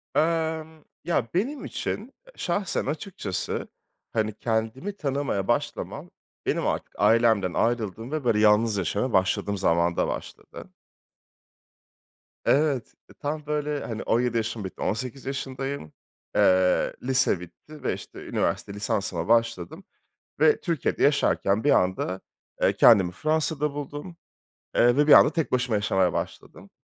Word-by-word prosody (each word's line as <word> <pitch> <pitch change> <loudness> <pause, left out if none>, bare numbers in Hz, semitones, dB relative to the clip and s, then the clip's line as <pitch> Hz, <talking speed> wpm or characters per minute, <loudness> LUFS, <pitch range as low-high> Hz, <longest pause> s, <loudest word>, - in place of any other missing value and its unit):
Emm. 160 0 0 0.2
Ya, 160 -8 0
benim 250 - -1
için, 230 +7 -4 0.2
şahsen 190 +2 -1
açıkçası, 145 - -4 0.5
hani, 110 -1 0
kendimi 115 - -2
tanımaya 135 - -1
başlamam - - -2 0.4
benim - - 0
artık - - -3
ailemden 110 -3 +3
ayrıldığım 115 +1 -1
ve 155 -2 -2
böyle, 115 -3 +2
yalnız 105 0 +4
yaşamaya 105 +6 -1
başladığım 95 +2 +1
zamanda 85 -2 +2
başladı. - - -7 1.8
Evet, 140 -4 +2 0.3
tam, 150 +1 -3
böyle, 150 -1 -2
hani, 115 -2 -5
17 120 0 +1
yaşım 115 -1 -2
bitti, 95 - -8
18 130 +4 -3
yaşındayım. 135 - -4 0.4
Eee, 95 0 +3
lise 125 -7 +2
bitti 90 - -13
ve, - - 0
işte, - - -9
üniversite 100 - -1
lisansıma 105 0 -2
başladım 115 -6 +1 0.6
ve 155 0 +5
Türkiye'de 165 -7 -1
yaşarken 135 -7 +2
bir 145 - +4
anda, 95 -1 +1 0.4
eee, - - +4
kendimi 100 -7 +6
Fransa'da 155 - -1
buldum, 145 +4 -6 0.6
eee, 120 +1 +4
ve 145 +1 +4
bir 150 - +6
anda 150 - +8
tek 165 -3 -2
başıma 125 -3 +1
yaşamaya 95 -4 +1
başladım. - - -6
125 Hz, 125 wpm, -26 LUFS, 105-150 Hz, 1.8 s, anda